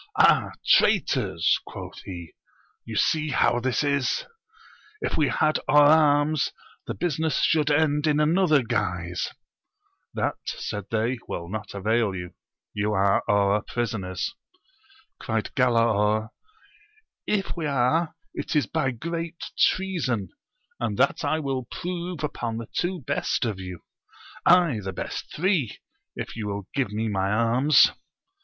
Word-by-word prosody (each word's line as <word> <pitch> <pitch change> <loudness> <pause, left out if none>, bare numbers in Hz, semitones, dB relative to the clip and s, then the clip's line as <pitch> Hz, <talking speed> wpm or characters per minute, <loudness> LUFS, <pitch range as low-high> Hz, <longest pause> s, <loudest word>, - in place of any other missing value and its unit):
Ah, - - +5 0.2
traitors! 130 - +3
quoth - - -8
he, 85 -4 -8 0.5
you 115 - -6
see 155 +6 +1
how 120 -2 +2
this 130 +3 0
is! 140 -2 0 0.7
if - - -2
we 150 - +3
had 155 +2 +1
our 150 0 +6
arms 150 -1 +4 0.4
the - - -3
business 160 -3 0
should 155 -2 +3
end 150 0 +2
in 150 -1 +3
another 155 -2 +3
guise! 90 -5 -2 0.9
That, - - -1
said 105 -2 -4
they, 115 +3 0
will 85 0 -5
not 105 0 -6
avail 105 0 +1
you: 90 -1 -6 0.4
you 105 +1 -1
are 100 0 +3
our 100 0 +3
prisoners! 110 - -3 0.9
Cried 110 -2 -2
Galaor, 110 -4 +2 1.0
If 200 -2 -1
we 165 -3 -2
are 145 +5 +1 0.2
it - - -4
is 145 -5 +3
by 130 - 0
great 165 +6 -5
treason, 150 - +1 0.5
and 110 -4 -2
that - - +2
I 150 +2 +1
will 135 -4 -3
prove 175 -2 -5
upon 120 -6 -3
the 115 -1 -6
two 175 -1 -1
best - - 0
of 105 -5 -3
you; 90 -2 -7 0.7
aye, 170 -9 +5
the 95 0 -4
best - - -5
three, 165 - 0 0.4
if - - -6
you 110 -2 -4
will 100 -1 -4
give 135 -6 0
me 110 +2 -2
my 95 -2 0
arms 115 +7 +4
125 Hz, 135 wpm, -25 LUFS, 105-155 Hz, 1.0 s, our